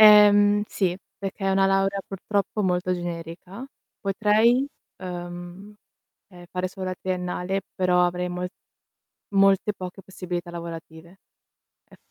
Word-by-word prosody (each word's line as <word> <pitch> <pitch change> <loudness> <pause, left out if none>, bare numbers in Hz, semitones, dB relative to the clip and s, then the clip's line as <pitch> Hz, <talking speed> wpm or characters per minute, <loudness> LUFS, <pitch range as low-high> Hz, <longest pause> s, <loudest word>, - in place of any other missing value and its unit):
Ehm, 205 -1 +8
sì, 185 -2 0 0.2
perché 195 0 -5
è 195 - +3
una 195 0 +4
laurea 195 0 +2
purtroppo 200 +2 -1
molto 180 0 +1
generica. 175 +6 -6 0.3
Potrei, 215 +6 +3 0.4
uhm, 175 +3 -7 0.5
ehm, 175 -2 -13
fare 185 0 -1
solo 185 0 -6
la 185 - -2
triennale, 180 +1 -2
però 180 -1 +3
avrei 180 0 -2
mol 180 0 -3 0.9
molte 195 +1 +4
poche 185 +1 -7
possibilità 180 -2 -5
lavorative. 170 +1 -8 0.7
Ef - - -17
185 Hz, 120 wpm, -25 LUFS, 180-195 Hz, 0.9 s, Ehm